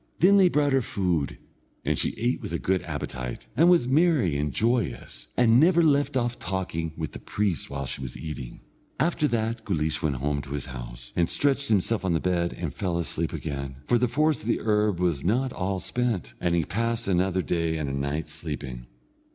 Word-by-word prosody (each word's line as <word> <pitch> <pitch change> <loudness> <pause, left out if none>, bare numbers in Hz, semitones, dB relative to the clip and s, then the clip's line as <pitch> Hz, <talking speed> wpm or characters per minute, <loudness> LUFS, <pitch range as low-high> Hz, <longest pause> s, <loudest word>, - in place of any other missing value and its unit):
Then 195 +4 +6
they 190 -2 +6
brought 145 -3 +2
her 135 - +4
food, 90 - -1 0.5
and - - +2
she - - -2
ate 120 +2 0
with - - -6
a - - +1
good 95 +1 0
appetite, 60 -1 -5
and 170 +3 +5
was 170 -8 +4
merry 140 - +3
and 75 0 -1
joyous, 105 - -1
and 120 -1 +5
never 170 +2 +5
left 145 -3 +3
off 120 -1 -1
talking 85 -4 -3
with 80 -2 -3
the - - -8
priest 100 -4 -2
while 70 0 -4
she 65 - -5
was 65 -2 -6
eating. 75 -6 -7 0.4
After 150 0 +2
that 115 -2 -1
Guleesh 80 -6 -1
went 75 -3 0
home 70 +2 -1
to 70 0 -7
his 70 -2 -3
house, - - -8
and 85 -1 +2
stretched 140 0 +2
himself 105 +1 +2
on 95 -2 +1
the 80 - +2
bed 85 -1 0
and - - -5
fell 90 -4 -2
asleep 85 -1 0
again, 70 -3 -4
for 120 - +3
the 125 - +2
force 150 +5 +2
of 105 - -8
the 120 - +1
herb 105 -4 +1
was 85 -6 0
not 125 +7 +1
all 95 +1 -2
spent, 120 -3 -1
and 85 -1 +1
he 85 -3 +1
passed 115 +4 -1
another 95 0 +1
day 85 -2 0
and 75 -2 -2
a 70 - -3
night 70 +3 -2
sleeping. 75 -6 -5
90 Hz, 205 wpm, -26 LUFS, 75-120 Hz, 0.5 s, Then